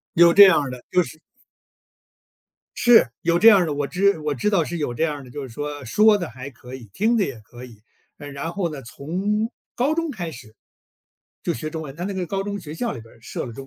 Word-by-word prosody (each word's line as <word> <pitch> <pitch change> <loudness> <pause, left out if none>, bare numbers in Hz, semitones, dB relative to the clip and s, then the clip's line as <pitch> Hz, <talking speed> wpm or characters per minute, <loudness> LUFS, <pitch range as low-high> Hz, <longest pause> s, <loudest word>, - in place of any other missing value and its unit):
有 170 0 +7
这 200 +2 +10
样 185 -5 +5
儿 135 - -5
的， 125 -1 -8
就 180 - +3
是 155 -2 -10 1.6
是， 240 - +6
有 170 0 +2
这 225 +6 +7
样 205 -3 +8
儿 175 - +1
的， 150 - -2
我 145 -1 -2
知 195 +1 +1
我 150 -1 -2
知 135 - 0
道 190 -6 +2
是 170 +2 -5
有 135 -6 -2
这 - - -3
样 150 -2 -1
儿 140 - -10
的， 125 - -14
就 145 - -6
是 130 - -7
说， 145 +3 -6
说 210 - +4
得 175 - -4
还 125 +3 -9
可 125 0 -12
以， 120 -4 -10
听 225 - +1
得 205 - +2
也 135 -7 -6
可 120 +4 -13
以。 115 -4 -15 0.4
嗯， 145 -1 -9
然 140 +4 -5
后 175 -3 -2
呢 135 -2 -8
从 195 - -3 0.3
高 280 +6 +1
中 330 -2 -2
开 175 -9 -5
始， 120 -5 -13 0.9
就 - - -1
学 155 +7 -5
中 160 0 -5
文， 135 -2 -9
他 175 - -5
那 200 - -4
个 185 -2 -3
高 195 +2 -2
中 205 0 -4
学 155 -4 -9
校 235 +5 -2
里 - - -8
边 115 0 -16
儿 - - -21
设 120 - -6
了 120 - -8
中 135 +3 -10
155 Hz, 275 characters per minute, -22 LUFS, 135-195 Hz, 1.6 s, 这